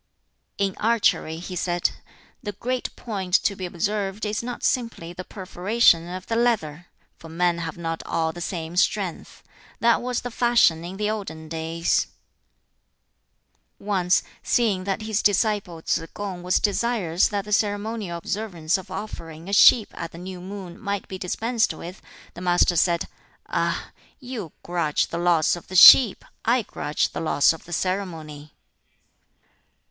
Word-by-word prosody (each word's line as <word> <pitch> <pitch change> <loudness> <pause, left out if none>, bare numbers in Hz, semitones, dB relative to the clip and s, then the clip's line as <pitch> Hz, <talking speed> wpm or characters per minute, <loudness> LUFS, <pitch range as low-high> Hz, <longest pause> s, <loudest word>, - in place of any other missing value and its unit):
"In 195 -2 0
archery," 215 -8 +1
he 180 +2 -7
said, 175 0 0 0.5
"the 205 -4 -5
great 250 +5 -3
point 190 -6 -2
to 200 - +1
be 185 -1 -5
observed 200 +3 -2
is 210 +1 -2
not 245 0 -6
simply 230 -9 -1
the 180 +1 -7
perforation 185 -1 +2
of 185 0 -6
the 225 - -2
leather; 175 -9 0 0.3
for 165 - -12
men 170 +1 +1
have 165 -1 -5
not 165 -1 -3
all 160 -1 0
the 175 - -8
same 165 -1 -4
strength. 185 -1 -1 0.4
That 235 0 +3
was 250 -1 -2
the 245 - -6
fashion 230 -9 +3
in 180 +3 -7
the 210 +1 0
olden 160 -7 -6
days." 165 +1 0 1.7
Once, 185 -3 +1 0.2
seeing 205 -6 +1
that 200 +2 -2
his 215 -1 -1
disciple 205 -5 +1
Tsz - - +1
kung 195 -3 -5
was 180 +1 +2
desirous 205 -5 +1
that 205 -1 -3
the 210 - -3
ceremonial 205 -3 -1
observance 175 -2 -2
of 190 - -12
offering 170 -4 -7
a 200 - -5
sheep 215 +1 +7
at 170 - -6
the - - -10
new 180 +1 -8
moon 190 -2 -8
might 200 -3 -3
be 190 - -7
dispensed 225 +5 0
with, 175 +2 -9 0.3
the 175 - -10
Master 175 0 +3
said, 170 0 +2 0.4
"Ah! - - -2 0.3
you 245 - -6
grudge 170 -4 0
the 170 - -3
loss 175 -2 +3
of 175 - -11
the 185 - -8
sheep; 220 +3 +9 0.2
I 240 +1 +2
grudge 150 -6 -2
the - - -5
loss 155 -1 +3
of 160 - -12
the 175 - -12
ceremony." 160 -5 -4
185 Hz, 155 wpm, -24 LUFS, 170-210 Hz, 1.7 s, sheep